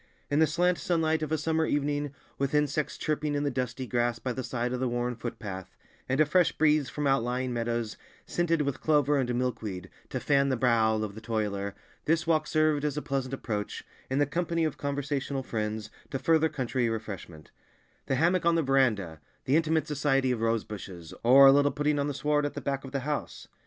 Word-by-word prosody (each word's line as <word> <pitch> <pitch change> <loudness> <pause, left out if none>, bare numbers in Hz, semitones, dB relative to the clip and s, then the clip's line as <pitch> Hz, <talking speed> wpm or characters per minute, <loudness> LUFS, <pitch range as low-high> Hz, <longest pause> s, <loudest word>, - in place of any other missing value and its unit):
In 145 - +3
the 160 - +5
slant 175 +3 +1
sunlight 160 -2 +1
of 155 -1 -3
a 160 - +2
summer 160 +1 0
evening, 145 0 0 0.3
with 140 +1 0
insects 150 0 0
chirping 150 -1 -1
in 145 - 0
the 145 - 0
dusty 125 0 -3
grass 120 -1 0
by 125 +2 -3
the 130 - -4
side 120 0 -2
of 125 - -2
the 130 - 0
worn 120 0 -1
foot 120 0 -6
path, 95 -4 -7 0.3
and 135 +3 +1
a 155 - +6
fresh 160 -1 +3
breeze 150 -2 +2
from 150 - -3
outlying 125 -1 +1
meadows 115 -2 -2 0.3
scented 165 -3 +1
with 140 -2 -3
clover 150 -2 +3
and 125 -2 0
milkweed 105 -7 -3 0.2
to 130 - -3
fan 140 +1 +2
the 130 - +1
brow 115 -2 +3
of 110 -2 -2
the 110 - -10
toiler, 105 -3 -2 0.3
this 165 +2 +2
walk 155 -2 +2
served 155 -2 +2
as 150 -1 -1
a - - -1
pleasant 135 -3 -2
approach, 105 -5 -4 0.3
in 130 - 0
the 145 - +4
company 170 +2 -1
of 155 -3 0
conversational 140 -1 -2
friends, 110 -2 -3 0.2
to - - -2
further 160 +4 +3
country 130 -4 -1
refreshment—the 105 - -7
hammock 175 +6 +2
on 170 0 +3
the 165 - +2
verandah, 110 - +1 0.2
the 135 - +2
intimate 160 0 +2
society 135 -3 +1
of 120 -3 -2
rosebushes, 105 -7 -3
or 130 +4 +8
a 135 - +10
little 145 +1 +4
putting 145 0 0
on 140 - 0
the 145 - -3
sward 150 +1 +1
at 145 - -3
the - - -3
back 135 -1 -2
of 135 - -8
the 140 -1 -2
house. 150 +2 -4
135 Hz, 205 wpm, -28 LUFS, 120-150 Hz, 0.3 s, a